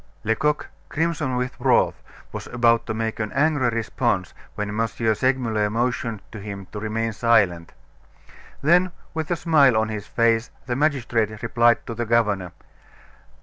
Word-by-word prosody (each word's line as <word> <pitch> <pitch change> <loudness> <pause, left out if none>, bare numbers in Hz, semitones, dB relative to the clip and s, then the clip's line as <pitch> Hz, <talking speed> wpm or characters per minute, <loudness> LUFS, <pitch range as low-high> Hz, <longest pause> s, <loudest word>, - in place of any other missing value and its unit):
Lecoq, 150 +7 0 0.2
crimson 155 -4 -1
with 125 0 -2
wrath, - - +2 0.3
was - - -7
about 120 -1 +2
to 110 - -2
make 110 0 -3
an 110 -1 -2
angry 145 -3 +2
response 115 -3 -1 0.2
when 105 0 -3
M. 110 +2 0
Segmuller 115 -1 0
motioned 115 -1 -2
to 110 - -8
him 100 -1 -7
to 105 - -5
remain 110 +1 -2
silent. 100 -8 +2 0.9
Then 175 +4 +4 0.2
with 160 -1 -3
a 175 - +1
smile 150 -8 +4
on 110 0 +1
his 105 -2 -5
face 115 0 +2 0.2
the 125 - -2
magistrate 120 -7 0
replied 115 0 +3
to 115 - -5
the 120 0 -3
governor. 105 -6 +1
115 Hz, 145 wpm, -23 LUFS, 110-130 Hz, 0.9 s, Then